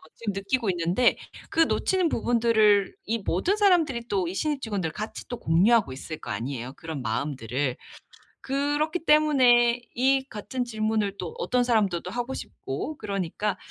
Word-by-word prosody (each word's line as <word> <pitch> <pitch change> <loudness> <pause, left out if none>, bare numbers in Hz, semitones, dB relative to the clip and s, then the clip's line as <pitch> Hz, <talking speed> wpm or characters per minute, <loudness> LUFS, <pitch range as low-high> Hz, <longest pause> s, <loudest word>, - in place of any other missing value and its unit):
지금 225 -3 -3
느끼고 200 +4 -1
있는데 180 +7 +2 0.3
그 - - -3
놓치는 370 +2 +2
부분들을 220 -5 +3
이 225 +2 0
모든 355 - +1
사람들이 325 - +2
또 195 -5 0
이 - - -5
신입 295 0 -1
직원들 195 -7 -2
같이 215 +1 -6
또 245 -1 -5
공유하고 190 - +3
있을 145 +4 -7
거 - - -9
아니에요 120 +4 -4
그런 160 -4 -6
마음들을. 125 +1 -2 0.7
그렇기 290 +5 -1
때문에 250 -6 +5
이 265 +2 +2
같은 245 +4 -4
질문을 215 -3 -1
또 175 -4 -5
어떤 250 0 +1
사람들도 200 -7 +1
하고 245 +4 -3
싶고 310 - -6
그러니까 200 0 -2
220 Hz, 335 characters per minute, -26 LUFS, 180-260 Hz, 0.7 s, 때문에